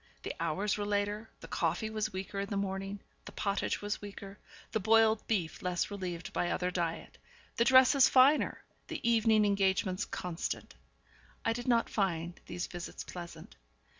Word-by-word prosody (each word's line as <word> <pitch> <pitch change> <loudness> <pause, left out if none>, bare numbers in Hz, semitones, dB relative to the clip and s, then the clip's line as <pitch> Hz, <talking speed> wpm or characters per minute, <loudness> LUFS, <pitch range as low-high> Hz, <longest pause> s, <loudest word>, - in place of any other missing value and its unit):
The - - -3
hours 190 +6 0
were 205 - -1
later, 205 +2 -1
the - - -9
coffee 220 -1 -1
was 215 -1 -1
weaker 190 +1 -5
in 200 0 -3
the 200 - -2
morning, 195 0 -3 0.2
the - - -8
pottage 200 0 -1
was 205 0 -2
weaker, 200 -1 -9 0.3
the 220 - 0
boiled 220 +1 +4
beef 185 -8 -1
less 180 +2 -1
relieved 180 -4 -5
by 175 - 0
other 180 0 -1
diet, 170 -2 -3 0.4
the 235 - +4
dresses 260 +1 +7
finer, 270 +4 +4 0.2
the - - -4
evening 220 -2 +4
engagements 190 -1 +1
constant. 175 -2 -4 0.7
I 225 - +3
did 240 +1 -6
not 235 -2 +3
find 175 -4 -2
these 175 +1 -3
visits 175 -1 -7
pleasant. 170 -2 -9
200 Hz, 160 wpm, -32 LUFS, 180-220 Hz, 0.7 s, dresses